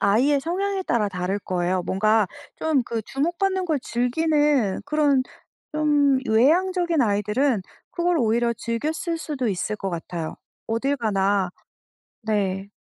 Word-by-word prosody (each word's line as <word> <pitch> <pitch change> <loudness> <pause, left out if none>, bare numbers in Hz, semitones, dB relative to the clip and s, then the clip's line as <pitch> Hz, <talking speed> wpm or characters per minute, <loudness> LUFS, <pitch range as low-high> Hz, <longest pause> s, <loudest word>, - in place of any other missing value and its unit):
아이의 265 +8 +3
성향에 385 +4 -1
따라 215 -4 +1
다를 185 +2 -2
거예요. 180 -1 -1
뭔가 215 +2 +2 0.3
좀 310 -5 +1
그 230 -2 -3
주목받는 350 - -1
걸 310 -4 +1
즐기는 275 -3 +1
그런 285 -3 +2 0.5
좀 290 -3 +3
외향적인 340 +8 +3
아이들은 210 +2 +1 0.3
그걸 345 0 +1
오히려 235 0 +2
즐겼을 310 +10 -2
수도 270 -7 -2
있을 200 +2 -2
것 195 -1 -4
같아요. 165 -1 -5 0.3
어딜 265 +6 0
가나 200 -4 +1 0.7
네. 200 -2 -1
240 Hz, 265 characters per minute, -24 LUFS, 205-305 Hz, 0.7 s, 아이의